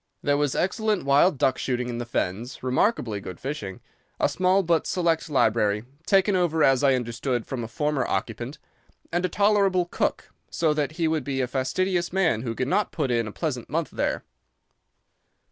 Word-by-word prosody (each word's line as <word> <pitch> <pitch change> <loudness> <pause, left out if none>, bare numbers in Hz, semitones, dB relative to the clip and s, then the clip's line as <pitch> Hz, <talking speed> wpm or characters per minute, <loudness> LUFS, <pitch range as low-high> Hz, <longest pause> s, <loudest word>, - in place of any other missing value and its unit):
There 145 -1 +2
was 145 -2 0
excellent 210 0 0
wild 140 +4 +4
duck 130 0 +2
shooting 125 -1 -1
in 120 -1 -4
the 120 - -5
fens, 120 +3 -3
remarkably 130 - +1
good 95 -2 -8
fishing, 120 -9 -5 0.4
a - - +3
small 185 +1 +2
but 165 -2 +1
select 170 -4 0
library, 110 -6 +2 0.2
taken 195 0 +4
over, 165 -4 +2
as 135 0 +4
I 135 -2 +5
understood, 120 0 -2
from 125 -3 -4
a - - -4
former 150 +3 -1
occupant, 120 +7 -3 0.5
and 175 +1 0
a 185 - +1
tolerable 200 -2 +3
cook, 175 - -2 0.2
so 160 -2 +1
that 150 0 -1
he 165 0 0
would 155 -3 0
be 135 0 -2
a 130 - +1
fastidious 175 +7 -1
man 175 - +2
who 115 -2 -4
could 130 - -1
not 205 +7 +1
put 140 -5 -1
in 115 -2 +1
a - - -5
pleasant 130 -2 -4
month 160 +2 -1
there. - - -1
145 Hz, 180 wpm, -25 LUFS, 120-175 Hz, 0.5 s, I